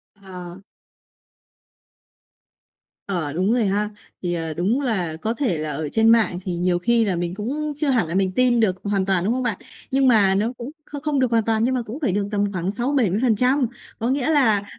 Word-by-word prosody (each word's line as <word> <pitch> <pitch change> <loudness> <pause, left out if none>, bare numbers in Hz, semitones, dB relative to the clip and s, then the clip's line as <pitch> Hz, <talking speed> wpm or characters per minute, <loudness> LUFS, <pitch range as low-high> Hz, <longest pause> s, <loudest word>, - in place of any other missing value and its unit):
Ờ. 185 -2 -10 2.5
Ờ, 170 -7 -2
đúng 185 +6 +1
rồi 240 -3 +2
ha. 205 +2 0 0.3
Thì, 175 -1 -2
ờ, 165 -2 -3
đúng 200 - 0
là 190 - -1
có 220 - -1
thể 235 - -1
là 155 0 -3
ở 150 +1 -3
trên 225 +5 +3
mạng 225 -6 +4
thì 180 -2 -2
nhiều 175 0 +1
khi 230 +5 +2
là 195 -3 0
mình 175 0 -2
cũng 295 +8 -3
chưa 295 0 0
hẳn 240 -10 +2
là 165 - -4
mình 190 -1 +2
tin 250 -2 +3
được 205 -5 +2
hoàn 200 -2 0
toàn, 190 -3 +1
đúng 220 - +2
không 255 +1 -1
bạn? 225 -6 -1 0.3
Nhưng 270 0 +3
mà 205 -6 +4
nó 220 +5 0
cũng 240 +4 -7
không 290 -1 -8
không 300 -2 0
được 255 -2 +1
hoàn 230 -1 +3
toàn 225 -1 +1
nhưng 255 +2 +1
mà 250 - 0
cũng 245 +8 -7
phải 265 - +1
được 200 +1 -1
tầm 205 -1 0
khoảng 185 +1 -2
60%-70%. 250 +2 +1 0.3
Có 230 - -1
nghĩa 270 +2 0
là 230 -10 +3
210 Hz, 210 wpm, -22 LUFS, 185-250 Hz, 2.5 s, mạng